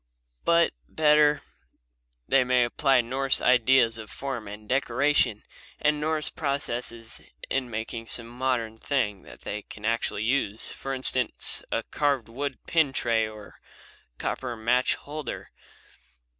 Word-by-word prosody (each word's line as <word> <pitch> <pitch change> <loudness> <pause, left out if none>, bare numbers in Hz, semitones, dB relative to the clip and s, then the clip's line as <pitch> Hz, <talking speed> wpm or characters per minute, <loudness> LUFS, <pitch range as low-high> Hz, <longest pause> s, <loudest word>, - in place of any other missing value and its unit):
But, 170 0 +4 0.2
better, 150 -1 +4 0.8
they 135 -1 +4
may 125 0 +3
apply 135 +2 +3
Norse 130 +3 +2
ideas 125 -2 +4
of 110 - -9
form 130 -6 -5
and 105 +1 -9
decoration 130 -3 +2 0.4
and 150 0 +1
Norse 155 0 0
processes 120 -5 -3 0.3
in 135 -2 0
making 115 +1 -5
some 115 - -2
modern 120 -2 -2
thing 105 -9 -1
that - - -14
they 105 - -4
can 105 +1 -11
actually 115 -2 0
use; 110 -3 -1
for 135 - -6
instance, 130 -2 +1
a - - 0
carved 140 -6 0
wood 135 +3 -4
pin 160 -5 +2
tray 115 -4 +1
or 105 -1 -12 0.6
a - - -47
copper 125 -2 -3
match 120 +3 +2
holder. 150 +1 -7
125 Hz, 130 wpm, -27 LUFS, 115-140 Hz, 0.8 s, But